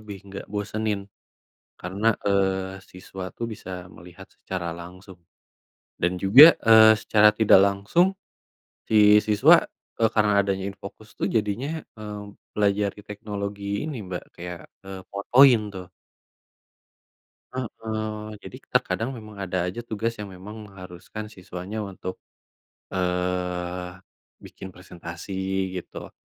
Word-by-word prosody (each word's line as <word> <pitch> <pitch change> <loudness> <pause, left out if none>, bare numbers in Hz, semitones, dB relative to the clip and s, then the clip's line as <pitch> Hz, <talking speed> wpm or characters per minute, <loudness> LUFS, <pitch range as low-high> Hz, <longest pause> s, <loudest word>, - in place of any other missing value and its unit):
lebih 105 -2 -8
nggak 100 0 -8
bosenin 105 0 -2 0.8
karena, 95 +5 -4 0.2
eee, 95 -1 0
siswa 95 +1 -9
tuh 120 - -4
bisa 100 - -10 0.3
melihat 90 +3 -13
secara 90 -2 -5
langsung 90 +2 -12 0.8
dan 90 +1 +2
juga, 115 +10 +10 0.2
eee, 110 -1 +9
secara 105 -1 +5
tidak 110 -3 +7
langsung 100 - +2 0.8
si 110 - 0 0.3
siswa, 105 -1 +6 0.5
eee, 110 -1 +4
karena 105 -1 +3
adanya 95 -1 -2
InFocus 100 +2 -11
tuh - - +1
jadinya, 110 +5 0 0.3
eee, 105 -1 -6 0.4
pelajari 105 0 0
teknologi 100 -1 -5 0.2
ini, 150 -2 -4
Mbak, 90 - -4
kayak, 90 0 -7 0.2
eee, 95 -1 -8
fotoin 120 +5 +6 0.2
tuh. 90 -1 -7 1.6
Heeh. 110 -3 -5
Jadi - - -9
terkadang 110 +8 0
memang 110 -2 -11
ada 90 -1 -1
aja 95 +7 -5
tugas 115 +1 -3
yang 105 -2 -8
memang 95 +4 -10
mengharuskan 95 +3 -9
siswanya 95 +1 -7
untuk, 95 -2 -6 0.8
eee, 90 0 -2 0.5
bikin - - -10
presentasi 85 +1 -9 0.4
gitu. - - -10
100 Hz, 115 wpm, -25 LUFS, 90-110 Hz, 1.6 s, juga